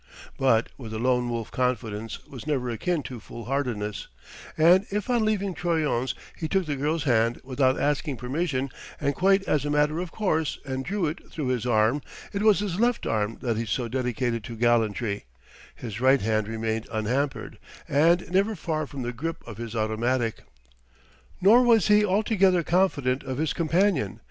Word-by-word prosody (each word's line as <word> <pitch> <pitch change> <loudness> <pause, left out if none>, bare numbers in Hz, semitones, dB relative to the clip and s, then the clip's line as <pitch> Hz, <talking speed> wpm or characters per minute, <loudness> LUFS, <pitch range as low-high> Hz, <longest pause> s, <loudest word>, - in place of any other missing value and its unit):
But 115 -4 +2
with 115 -4 -7
the - - -3
Lone 125 +1 +1
Wolf 115 -2 -4
confidence 115 -3 -2
was 135 +1 -10
never 130 -5 0
akin 170 +6 -1
to 125 -2 -7
foolhardiness; 115 -3 -4 0.5
and 175 +5 +5
if 210 +4 -2
on 240 -2 +2
leaving 200 -3 0
Troyon's 155 -8 0 0.2
he 160 - -4
took 190 +2 +1
the 150 -2 -2
girl's 150 +3 -1
hand 115 -3 +2
without 130 0 +1
asking 145 -1 0
permission 135 +1 -2 0.3
and 140 -1 0
quite 195 +5 +3
as 150 -7 +1
a 145 - -2
matter 150 +2 +2
of 180 -2 -4
course, 160 -8 0
and 130 -1 -3
drew 195 +3 -1
it 155 +2 -5
through 145 -5 -3
his 125 -2 -1
arm 115 +4 +3 0.3
it 200 - -1
was 210 -2 +4
his 200 -3 -2
left 240 0 +1
arm 110 0 -1
that 115 -3 0
he 115 - -1
so 120 +2 -1
dedicated 125 -1 -1
to 115 - -7
gallantry; 110 - +1 0.5
his 115 -1 -7
right 130 +1 +5
hand 110 0 0
remained 110 0 -2
unhampered, 125 +6 -2 0.3
and 165 +5 +3
never 200 +4 +2
far 155 -3 -2
from 135 -3 -6
the 120 +1 -3
grip 165 +7 -5
of 115 -4 -8
his 115 -1 -6
automatic. 115 +2 0 1.0
Nor 215 +7 +7
was 230 -4 +4
he 210 0 +6
altogether 195 -3 +3
confident 145 -8 +1
of 130 -2 -4
his 155 +1 0
companion. 170 - +1
135 Hz, 175 wpm, -26 LUFS, 115-175 Hz, 1.0 s, Nor